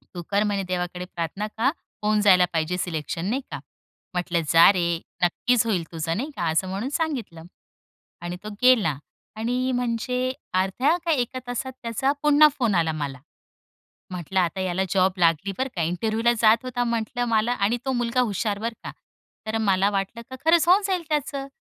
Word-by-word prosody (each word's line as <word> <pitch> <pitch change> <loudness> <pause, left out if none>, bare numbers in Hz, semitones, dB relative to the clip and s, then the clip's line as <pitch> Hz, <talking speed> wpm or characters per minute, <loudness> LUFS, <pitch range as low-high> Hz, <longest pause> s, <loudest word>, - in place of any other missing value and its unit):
तू 175 - -4
कर 200 +1 +2
म्हणे 200 -2 -1
देवाकडे 180 0 -3
प्रार्थना, 180 +4 -4
का 260 +5 +3 0.3
होऊन 210 0 +2
जायला 185 -3 +6
पाहिजे 165 +2 0
सिलेक्शन 165 -1 -3
नाही 265 +4 -1
का?" - - -4 0.5
म्हटलं 175 -1 0
"जा 165 +2 +8
रे 170 -2 0 0.3
नक्कीच 230 +6 +2
होईल 190 -7 0
तुझं" 165 0 -2
नाही 275 +6 -3
का? 175 - -2
असं 165 +4 +1
म्हणून 200 +8 -3
सांगितलं. 265 - -3 0.8
आणि 175 +1 -4
तो 215 - -6
गेला 220 - +4 0.4
आणि 250 +3 -1
म्हणजे 250 +1 -1 0.2
अर्ध्या 195 - +2
का 330 - +2
एका 255 -2 -1
तासात 245 +2 -3
त्याचा 235 +4 0
पुन्हा 300 +1 +7
फोन 225 -6 +2
आला 165 -2 +2
मला. 140 -4 -4 0.9
म्हटलं 185 +1 -1
आता 175 +2 -1
याला 185 0 0
जॉब 190 -1 +3
लागली 170 +3 +2
बरं 265 +1 0
का? 170 - 0
इंटरव्ह्युला 220 +8 +1
जात 225 +3 +4
होता 245 -1 -2
म्हटलं 235 +1 -1
मला 225 +1 +2
आणि 225 +1 +1
तो 265 - 0
मुलगा 240 0 0
हुशार 210 -2 -1
बरं 230 +1 -3
का? - - -5 0.6
तर 220 +1 -1
मला 200 -1 +2
वाटलं 200 +4 -3
का 260 - -6
खरंच 335 +1 +4
होऊन 385 +3 +6
जाईल 370 -3 -1
त्याचं 280 -2 -2
210 Hz, 175 wpm, -24 LUFS, 180-250 Hz, 0.9 s, जा